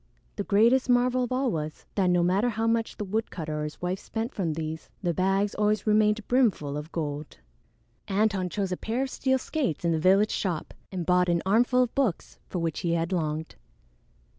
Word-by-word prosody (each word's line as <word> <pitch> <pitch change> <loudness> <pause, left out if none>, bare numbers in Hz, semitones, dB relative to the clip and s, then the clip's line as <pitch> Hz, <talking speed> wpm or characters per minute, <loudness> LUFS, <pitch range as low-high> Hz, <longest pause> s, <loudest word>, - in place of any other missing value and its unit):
The 205 - -2
greatest 235 +6 +3
marvel 250 +1 +3
of 245 - -9
all 255 -1 +1
was, 155 -3 -4
that 190 -3 +2
no 175 -1 +3
matter 195 +7 +2
how 225 0 -2
much 230 0 0
the 210 - -3
woodcutter 185 -7 -3
or - - -2
his 150 - -7
wife 180 +2 -1
spent 225 +3 -4
from 170 -6 -1
these, 160 0 -5
the 175 -2 +1
bags 195 +4 +1
always 210 0 +1
remained 215 0 +2
brimful 215 - +2
of 150 +2 -6
gold! 150 -2 -4 0.7
Antone 195 -2 +1
chose 195 0 -2
a 180 - -1
pair 235 +4 -1
of 270 - -4
steel 265 0 +1
skates 260 - -2
in 170 - +3
the 160 - +1
village 195 +5 +4
shop 175 -6 -2 0.2
and 180 -3 -3
bought 180 0 +3
an 170 -1 +1
armful 245 +5 +4
of 245 - -4
books 255 -11 -1
for - - -3
which 165 -2 -1
he 170 -2 0
had 170 +2 -1
longed. 160 -2 -2
195 Hz, 200 wpm, -27 LUFS, 170-225 Hz, 0.7 s, village